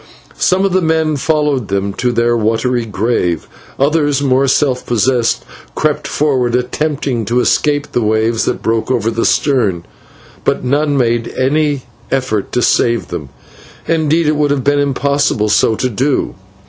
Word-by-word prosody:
Some 190 +1 +2
of 195 - 0
the 185 - +3
men 160 -2 +1
followed 145 -5 0
them 100 0 -2
to 125 +4 -1
their 120 0 +1
watery 115 +2 0
grave, 100 -5 -1 0.3
others, 145 0 +1
more 135 -1 +2
self 130 -1 +1
possessed, 120 +1 0 0.3
crept - - -1
forward, 130 -5 0
attempting 130 -1 -1
to 120 +4 +1
escape 145 +3 +1
the 120 - 0
waves 110 +1 +1
that - - -2
broke 115 +1 0
over 115 -3 0
the 115 0 -1
stern, 110 - +1 0.6
but - - 0
none 145 +3 +1
made 120 -2 +1
any 145 +1 +1 0.3
effort 130 -7 -1
to 125 - +1
save 115 -1 +1
them, 75 -6 -6 0.6
and 165 -1 +1
indeed 160 +2 +1
it 150 0 +1
would 150 -1 +1
have 140 -2 0
been 145 +1 +2
impossible 140 -5 0
so 110 +1 +3
to 130 - -1
do. 130 +5 -1
130 Hz, 160 wpm, -15 LUFS, 115-145 Hz, 0.6 s, the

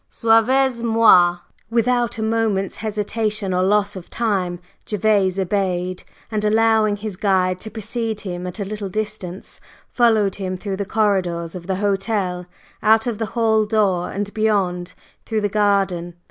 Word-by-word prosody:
"Suivez 235 +3 +2
moi!" 225 -7 +5 0.3
Without 240 0 +1
a 220 - -2
moment's 220 -3 0
hesitation 215 -2 -2
or 180 - +1
loss 200 +2 +2
of 185 -2 -9
time, 195 -6 -1 0.3
Gervase 205 -3 +2
obeyed, 185 -1 -1 0.3
and 210 -1 -1
allowing 220 0 +3
his 205 -1 -6
guide 185 -2 +1
to 220 - -6
precede 220 0 -4
him 180 -2 -5
at 180 - -7
a 200 - -2
little 205 0 -5
distance, 210 -2 -6 0.3
followed 220 -5 +2
him 185 -2 -3
through 195 0 -4
the 200 - -2
corridors 185 -6 0
of 180 -1 -8
the 190 - 0
hotel, 195 -2 -1 0.3
out 220 +1 +4
at 235 -4 -3
the 225 - -1
hall 220 -2 +3
door 200 -5 +1
and 205 +1 -4
beyond, 190 -5 0 0.3
through 220 -2 -2
the 205 - +1
garden. 195 -4 0
205 Hz, 150 wpm, -21 LUFS, 185-220 Hz, 0.3 s, moi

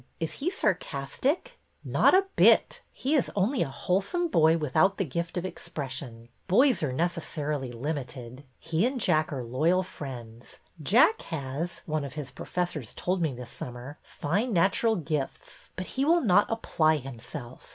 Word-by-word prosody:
Is 165 - -2
he 310 - 0
sarcastic? 255 - -1
" - - -42
Not - - +4
a 385 +1 +4
bit. - - +5
He 270 +4 -2
is 285 -6 +2
only 215 +7 +1
a - - +1
wholesome 200 - 0
boy 160 - +4
with 150 -5 -4
out 195 +1 +4
the 195 - 0
gift 170 +5 -3
of 175 - -2
expression. 130 -9 -6 0.2
Boys 250 +7 +4
are 150 -4 0
necessarily 150 -3 -2
limited. 130 -1 -5
He 165 +3 -1
and 260 0 -3
Jack 155 -7 +2
are 135 -4 -3
loyal 160 +10 +2
friends. 120 -9 -9 0.2
Jack 240 - +4
has, 160 +3 -4
one 155 -2 -1
of 140 -1 -6
his 145 -3 -5
professors 170 -10 -4
told 185 0 -1
me 155 -6 0
this 125 -1 -9
summer, 125 +4 -8
fine 205 - -2
natural 200 +6 +3
gifts, 150 -5 -4
but 185 - -4
he 265 - -2
will 335 +4 +4
not 205 -3 +4
apply 160 -8 +2
himself. 125 -1 -9
160 Hz, 160 wpm, -28 LUFS, 135-195 Hz, 0.2 s, bit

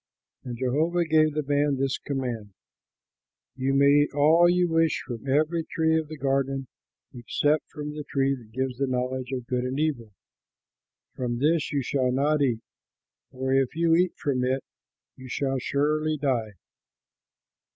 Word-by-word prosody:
And 120 -2 -6
Jehovah 155 +8 +1
gave 155 -1 +3
the 150 - 0
man 145 0 +1
this 135 0 -1
command: 120 -8 -4 1.0
"You 135 +1 0
may 140 +1 +5 0.2
eat 145 - -1
all 160 +4 +5
you 180 0 +3
wish 165 -1 +2
from 120 +2 -6
every 155 +4 +2
tree 160 0 +1
of 160 -1 0
the 155 +1 -8
garden, 135 0 0 0.5
except 145 +5 0
from 150 -1 -6
the 150 0 -6
tree 135 -1 0
that 120 -5 -10
gives 130 +1 -3
the 135 - +1
knowledge 130 0 -2
of 125 -2 -4
good 125 0 -1
and 130 +2 -2
evil; 135 -8 -1 1.0
from 120 -2 -3
this 155 +4 +1
you 140 -2 0
shall 130 0 0
not 145 +3 +1
eat, 120 -5 +1 0.7
for 130 +1 -2
if 135 0 +1
you 165 0 +3
eat 180 +2 +2
from 130 -3 -1
it 130 +1 0 0.5
you 130 - -11
shall 135 +1 -1
surely 155 +4 0
die." 125 -7 -1
135 Hz, 160 wpm, -26 LUFS, 130-155 Hz, 1.0 s, may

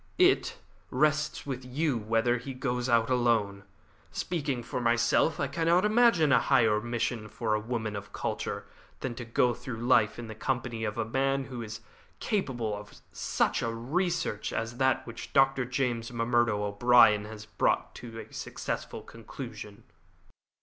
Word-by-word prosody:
It 370 +2 +3 0.3
rests 150 0 +1
with 130 -2 -4
you 135 0 -1
as - - -9
to - - -15
whether 115 +2 +3
he 130 +2 -7
goes 125 -1 -2
out 115 0 +3
alone. 110 -5 +1 0.5
Speaking 145 -8 -2
for 125 +1 -4
myself, 120 +6 +2
I - - +1
cannot 170 +5 +2
imagine 210 - +4
any - - +5
higher 115 -6 +3
mission 120 -1 -2
for 110 +1 -2
a 105 - +2
woman 110 -1 -3
of 100 0 -7
culture - - -3 0.4
than 130 - -3
to 120 - -7
go 120 +1 +2
through 120 0 -7
life 115 -2 +3
in 120 - -6
the 110 - -7
company 120 -1 -2
of 105 -1 -3
a - - 0
man 135 +4 0
who 125 -2 -7
is 110 -1 -7 0.4
capable 120 - -1
of 105 0 -11
such - - 0
a 115 - -1
research 160 - -1
as 115 +2 -3
that 130 -1 +2
which 115 -1 -9
Dr. 135 -1 +4
James 125 -2 -1
M'Murdo 120 -3 +1
O'Brien 105 0 +5
has 110 0 -9
brought 110 - 0
to 115 -2 -8
a - - -21
successful - - -5
conclusion." - - -9
120 Hz, 165 wpm, -29 LUFS, 115-135 Hz, 0.5 s, any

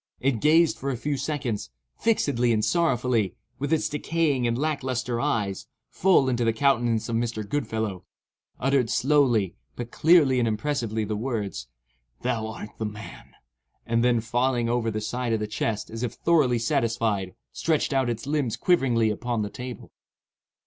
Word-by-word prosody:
It 130 -3 +1
gazed 160 +2 +4
for 140 - -3
a 130 - -2
few 145 +4 -2
seconds, 135 -5 -3 0.3
fixedly 135 - +1
and 110 -1 +2
sorrowfully, 125 - +1 0.2
with 145 +2 -2
its 160 - +2
decaying 150 -4 0
and 115 0 0
lack 150 0 -1
lustre 125 -2 -2
eyes, 105 -9 -1 0.2
full 180 -7 +4
into 120 -2 +1
the 115 -1 +2
countenance 120 -3 +2
of 115 - -2
Mr. 115 -3 -2
Goodfellow; 110 -8 -2 0.5
uttered 135 -2 +2
slowly, 125 - +2 0.2
but 120 0 -6
clearly 155 -6 +5
and 120 - +2
impressively, 110 -1 -1
the 105 +1 -2
words—"Thou 65 - -5
art 110 -1 -7
the 110 - -1
man!" 105 +1 -9 0.5
and 115 0 +1
then, 120 -2 +3
falling 120 +1 0
over 120 -1 0
the 110 -1 -3
side 120 +2 -2
of 110 - +1
the 105 - -2
chest 105 0 -3
as 115 0 -6
if 125 -2 -2
thoroughly 150 -7 +2
satisfied, 115 -4 0 0.2
stretched 155 -3 0
out 135 -2 +2
its 115 0 -3
limbs 140 -5 -1
quiveringly 120 -11 +2
upon 115 0 -2
the 105 - -5
table. 125 -2 -8
120 Hz, 160 wpm, -26 LUFS, 110-135 Hz, 0.5 s, clearly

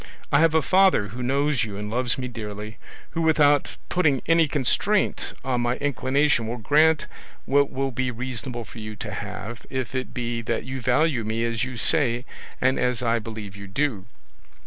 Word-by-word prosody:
I 140 - +5
have 165 0 +4
a 160 - +4
father 185 - +4
who 120 +6 -7
knows 140 +1 +1
you 105 -3 -5
and 105 0 -4
loves 120 0 0
me 130 -1 -3
dearly, 105 -2 -7 0.3
who 165 - -2
without 150 -3 +3
putting 150 -7 +2
any 165 -1 +4
constraint 150 - 0
on 125 -2 0
my 120 +1 +1
inclination 135 -2 +1
will 120 +2 -3
grant 155 +7 +3 0.4
what 140 +1 +3
will 135 0 -2
be 130 +1 -1
reasonable 125 0 -4
for 115 - -11
you 110 0 -6
to - - -6
have, 115 +1 -6
if 130 -2 -3
it 130 -1 -3
be 120 -1 -3
that 110 - -2
you 130 0 -5
value 125 +1 +2
me 110 +2 -1
as 115 -1 -1
you 125 -1 -4
say 125 -2 +2 0.3
and 130 +1 +2
as 125 0 0
I 115 0 +2
believe 105 -3 -7
you 100 0 -9
do." 110 -2 -1
125 Hz, 185 wpm, -24 LUFS, 115-145 Hz, 0.4 s, I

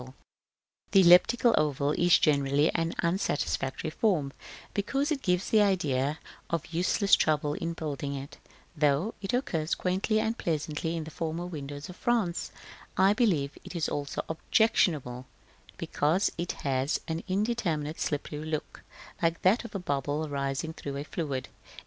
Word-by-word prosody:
Also, 130 +1 -12 0.8
the 195 - +8
elliptical 190 +7 +6
oval 145 -1 +1
is 175 +3 +5
generally 145 0 +2
an 165 0 -1
unsatisfactory 160 -4 -1
form, 155 -8 +1 0.4
because 275 +9 0
it 285 -3 -1
gives 180 -3 0
the 220 - +6
idea 150 -8 +1 0.3
of 165 -2 -1
useless 185 +4 +1
trouble 150 -1 +4
in 165 +2 -3
building 145 -3 -4
it, 140 +1 -8 0.4
though 150 +7 +2
it 195 - -3
occurs 170 - 0
quaintly 190 +4 0
and 225 +1 -1
pleasantly 160 0 -2
in 160 - -3
the 160 - -9
former 165 +2 -3
windows 145 -3 -6
of 180 - -10
France: 225 -9 0 0.5
I 190 +2 +5
believe 175 - +1
it - - -9
is 165 - 0
also 145 -1 -3
objectionable 155 - +1 0.5
because 160 +7 +1
it 175 +1 -3
has 135 +1 0
an 160 0 -2
indeterminate, 185 -7 -1
slippery 150 0 -3
look, 155 -1 -4 0.4
like 165 -1 0
that 200 +7 +4
of 235 - -9
a - - -1
bubble 145 -1 -2
rising 140 +2 -2
through 140 -3 -6
a 140 - -3
fluid. 145 -5 -3
160 Hz, 150 wpm, -29 LUFS, 145-185 Hz, 0.8 s, the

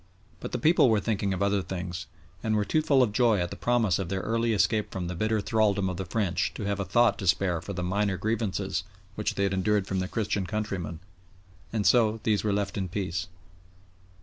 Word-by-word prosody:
But - - -6
the - - -1
people 155 -4 +4
were 110 -2 +3
thinking 100 -2 -1
of 95 +1 -1
other 100 0 +2
things, 90 -1 -5 0.3
and 110 -1 0
were 105 -1 +1
too 155 - +2
full 140 -4 +4
of 115 - 0
joy 115 -1 +4
at 85 0 -2
the - - -5
promise 115 -7 +1
of 95 -3 -3
their 95 0 -1
early 115 +2 0
escape 110 0 +1
from 95 -2 -4
the 90 - -3
bitter 110 +4 0
thraldom 100 -3 +1
of 90 - -4
the 95 - -4
French 95 -2 0
to - - -5
have 100 0 -1
a 100 - -1
thought 120 +6 +3
to 95 - -4
spare 90 -2 +2
for 100 - -6
the 90 -1 -3
minor 100 +1 0
grievances 100 -2 -1 0.3
which 105 +1 -2
they 100 - 0
had 100 -1 +1
endured 100 +1 +1
from 95 -1 -2
their 95 - -1
Christian 100 -3 -1
countrymen, 90 -7 -3 0.7
and 110 -3 -1
so 115 -2 +4
these 105 -2 +1
were 105 - +1
left 100 0 -1
in 95 - -2
peace. 90 -2 -3
100 Hz, 225 wpm, -27 LUFS, 95-110 Hz, 0.7 s, people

